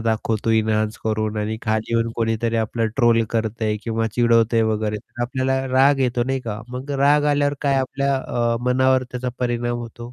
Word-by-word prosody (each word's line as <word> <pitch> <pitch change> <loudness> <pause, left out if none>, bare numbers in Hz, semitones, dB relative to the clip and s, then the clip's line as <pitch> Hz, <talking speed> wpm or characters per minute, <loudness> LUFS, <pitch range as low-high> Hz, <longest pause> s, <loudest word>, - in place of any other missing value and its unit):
दाखवतो 110 0 -1
एन्हान्स 110 -1 +1
करून 110 -1 -1
आणि 110 +1 -2
खाली 110 +1 -1
येऊन 115 0 +1
कोणीतरी 115 0 0
आपल्याला 110 0 -1
ट्रोल 115 -3 +4
करतंय 110 -1 -1
किंवा 115 -1 -1
चिडवतंय 115 -1 +3
वगैरे 105 0 -2
तर 120 - -8
आपल्याला 130 +1 -1
राग 135 +2 +4
येतो, 125 -2 +1
नाही 135 0 -1
का? 110 -3 -5
मग 130 +3 -7
राग 145 +2 +3
आल्यावर 145 0 +1
काय? 140 -2 +1
आपल्या 140 +1 -1
अ, 120 -3 -1
मनावर 130 +1 +3
त्याचा 125 0 -3
परिणाम 120 -1 -1
होतो. 120 +1 -9
120 Hz, 170 wpm, -21 LUFS, 110-130 Hz, -, ट्रोल